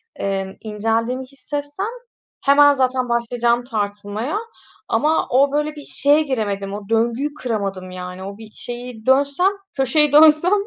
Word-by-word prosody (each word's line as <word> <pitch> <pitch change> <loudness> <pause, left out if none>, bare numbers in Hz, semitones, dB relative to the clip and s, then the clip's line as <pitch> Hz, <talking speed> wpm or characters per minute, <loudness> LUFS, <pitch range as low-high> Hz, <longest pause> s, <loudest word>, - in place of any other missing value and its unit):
emm, 195 -1 -3
inceldiğimi 225 +4 -1
hissetsem 290 +7 -5 0.6
hemen 285 +1 +6
zaten 255 -1 0
başlayacağım 235 0 0
tartılmaya 210 - -3 0.5
ama 310 +2 +2
o, 275 +2 +3
böyle, 300 +1 -1
bir 295 - -7
şeye 290 +2 +3
giremedim, 205 -8 -2
o 200 -1 -7
döngüyü 235 +6 0
kıramadım, 200 -8 -4
yani, 180 0 -7
o 200 +1 -7
bir 220 -1 -12
şeyi 240 -1 -8
dönsem, 280 +8 +3 0.2
köşeyi 285 +2 +3
dönsem 310 +4 +6
245 Hz, 130 wpm, -20 LUFS, 210-285 Hz, 0.6 s, hemen